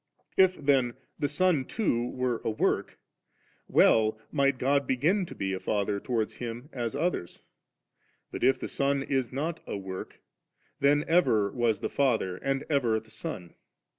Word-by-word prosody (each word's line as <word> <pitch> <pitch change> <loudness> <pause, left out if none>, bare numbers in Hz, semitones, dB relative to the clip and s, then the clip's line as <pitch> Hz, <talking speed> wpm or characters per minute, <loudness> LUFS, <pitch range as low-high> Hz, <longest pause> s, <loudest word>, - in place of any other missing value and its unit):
If 190 -1 +5
then 135 -4 +2 0.2
the 145 - 0
Son 155 -1 +2
too 125 - -1
were 125 -2 -2
a - - 0
work, 110 - 0 0.7
well 110 -1 +4
might 140 -2 +2
God 140 +1 +1
b^n 170 +9 +2
to - - -9
be 95 0 -2
a 95 - -2
Father 100 0 -1
towards 115 -1 -2
Hun 120 +3 -6
as 120 -1 -3
others; 150 - -2 0.9
but - - -5
if 135 - +4
the - - -5
Son 140 0 0
is 135 -3 -1
not 155 +5 -3
a - - -3
work, 95 -1 -7 0.6
tfien 145 +1 +4
ever 110 - +3
was 120 -3 0
the - - 0
Father 115 -10 +1
and 135 +4 -1
ever 120 -7 +2
the 110 0 -18
Son 110 - -7
130 Hz, 160 wpm, -28 LUFS, 110-145 Hz, 0.9 s, If